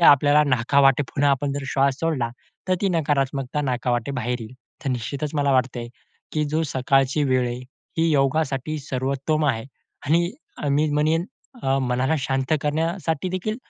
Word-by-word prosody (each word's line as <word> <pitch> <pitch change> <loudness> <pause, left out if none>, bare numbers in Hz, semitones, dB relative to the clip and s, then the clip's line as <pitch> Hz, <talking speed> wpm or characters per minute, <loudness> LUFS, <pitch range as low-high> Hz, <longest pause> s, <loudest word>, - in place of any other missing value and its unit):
आपल्याला 145 -1 +6
नाका 130 0 +2
वाटे 135 +1 +5
पुन्हा 145 +1 +1
आपण 140 +1 0
जर 140 0 -3
श्वास 135 0 +2
सोडला, 150 -8 0 0.4
तर 185 - +4
ती 200 - +2
नकारात्मकता 140 -3 0
नाका 125 -2 -1
वाटे 120 +3 0
बाहेर 125 0 -1
येईल. 110 +3 -9 0.3
तर 135 - 0
निश्चितच 140 +4 -3
मला 140 -2 +2
वाटतंय, 125 -2 0 0.4
की 155 -1 +1
जी 155 +2 0
सकाळची 135 +1 +2
वेळ 130 -2 +2
आहे, 120 +1 -4 0.4
ही 165 0 +3
योगासाठी 140 0 +1
सर्वोत्तम 140 +3 -1
आहे 115 -5 0 0.4
आणि 170 +4 +3 0.3
अ, 145 - 0
मी 150 +2 +2
म्हणेन 155 +3 +2 0.4
अ, 135 +1 +2
मनाला 130 +3 +1
शांत 135 +2 -1
करण्यासाठी 160 +2 -1
देखील, 200 +4 -2
140 Hz, 160 wpm, -23 LUFS, 130-155 Hz, 0.4 s, आपल्याला